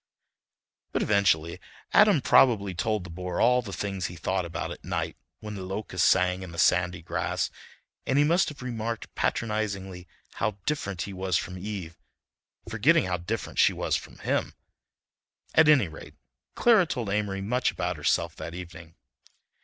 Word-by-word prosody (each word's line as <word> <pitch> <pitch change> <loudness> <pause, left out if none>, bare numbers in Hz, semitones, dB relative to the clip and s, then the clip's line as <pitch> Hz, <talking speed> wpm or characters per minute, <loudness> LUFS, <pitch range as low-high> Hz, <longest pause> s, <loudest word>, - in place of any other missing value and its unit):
But - - +1
eventually 85 -6 +2 0.3
Adam 205 -8 +6
probably 105 -7 +4
told 105 +2 -1
the 90 - -9
bore 90 +1 -4
all 125 +1 +4
the 110 -5 -8
things 95 -1 -3
he 90 - -9
thought 95 +3 -1
about 85 -1 -4
at - - -9
night - - -3 0.3
when 105 -1 -6
the 100 - -6
locusts 95 +3 0
sang 90 0 +2
in 95 -2 -8
the 85 - -10
sandy 90 -1 +2
grass, 85 - -2 0.6
and 135 - +2
he 145 - +6
must 170 +4 +3
have 140 -4 -10
remarked 115 -2 -4
patronizingly 100 -5 -2 0.3
how 105 -2 -2
different 100 - -2
he 100 - -7
was 95 -2 0
from 90 - -4
Eve, 90 -3 -6 0.7
forgetting 125 - +3
how 90 -1 -1
different 95 +4 -4
she - - +5
was - - -1
from - - -6
him... - - -1 1.0
at 160 -1 +6
any 135 -10 +5
rate, 80 - -11 0.4
Clara 220 -7 +5
told 120 -8 -3
Amory 100 -2 -1
much 125 +6 +1
about - - -3
herself - - 0
that 85 - -7
evening. 85 -2 -10
100 Hz, 160 wpm, -27 LUFS, 90-115 Hz, 1.0 s, Adam